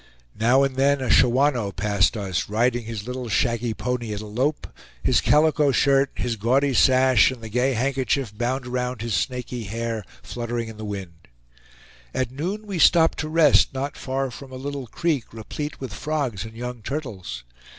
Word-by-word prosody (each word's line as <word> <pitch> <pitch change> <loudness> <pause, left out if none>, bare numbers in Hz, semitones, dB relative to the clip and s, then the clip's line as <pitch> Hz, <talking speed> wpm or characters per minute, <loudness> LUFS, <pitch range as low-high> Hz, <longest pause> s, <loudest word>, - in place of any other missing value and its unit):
Now 125 +5 +4
and 135 -1 -1
then 140 +1 +3
a 130 - -1
Shawanoe 125 -4 +3
passed 105 +2 +1
us, 95 -4 -2
riding 120 +2 +1
his 110 -2 -5
little 125 -1 -5
shaggy 115 +1 0
pony 125 -3 -3
at - - -5
a - - -7
"lope"; 130 +8 -1 0.4
his - - +3
calico 150 -1 +4
shirt, 135 +1 +3
his 120 -2 -2
gaudy 130 +6 +2
sash, 130 -2 +5
and 130 -2 -6
the 115 -1 -8
gay 125 +4 +1
handkerchief 130 -2 -1
bound 125 +3 -2
around 125 -2 -3
his 115 -2 -2
snaky 125 0 -2
hair 115 +1 -3 0.2
fluttering 120 -1 -4
in 110 - -10
the 110 - -6
wind. 95 -5 -7 0.9
At 130 -2 -1
noon 185 +11 -4
we 195 -4 -4
stopped 165 +1 +5
to 155 - -2
rest 155 -3 +4
not 140 +2 -3
far 135 0 -3
from 135 +2 -10
a - - -8
little 140 0 -5
creek 150 -1 -1
replete 145 +7 -6
with 130 -7 -6
frogs 140 -9 -2
and 110 0 -10
young 125 0 -6
turtles. 105 - -5
125 Hz, 175 wpm, -24 LUFS, 115-135 Hz, 0.9 s, sash